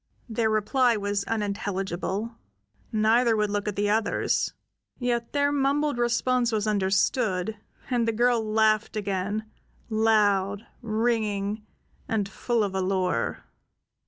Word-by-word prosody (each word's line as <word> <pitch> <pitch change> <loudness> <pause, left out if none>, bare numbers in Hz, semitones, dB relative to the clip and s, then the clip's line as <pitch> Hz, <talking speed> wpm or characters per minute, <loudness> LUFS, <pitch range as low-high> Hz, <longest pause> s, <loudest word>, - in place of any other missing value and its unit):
Their 225 -1 0
reply 230 +3 +2
was 205 0 -1
unintelligible; 200 0 -2 0.6
neither 225 +2 +3
would 210 -1 +1
look 205 0 -2
at 210 - -2
the 205 0 +1
others; 220 +1 +1 0.5
yet 240 -2 -1
their 285 0 +2
mumbled 285 -1 +1
response 240 0 +1
was 215 -1 0
understood, 200 0 +1 0.3
and 240 -3 +1
the - - +3
girl 240 +1 +2
laughed 215 0 +2
again, 200 +1 -2 0.5
loud, 210 -2 +2 0.2
ringing, 215 -2 -1 0.4
and 210 -3 0
full 230 +3 -1
of 200 -2 -2
allure. 185 -8 -1
215 Hz, 115 wpm, -26 LUFS, 200-235 Hz, 0.6 s, neither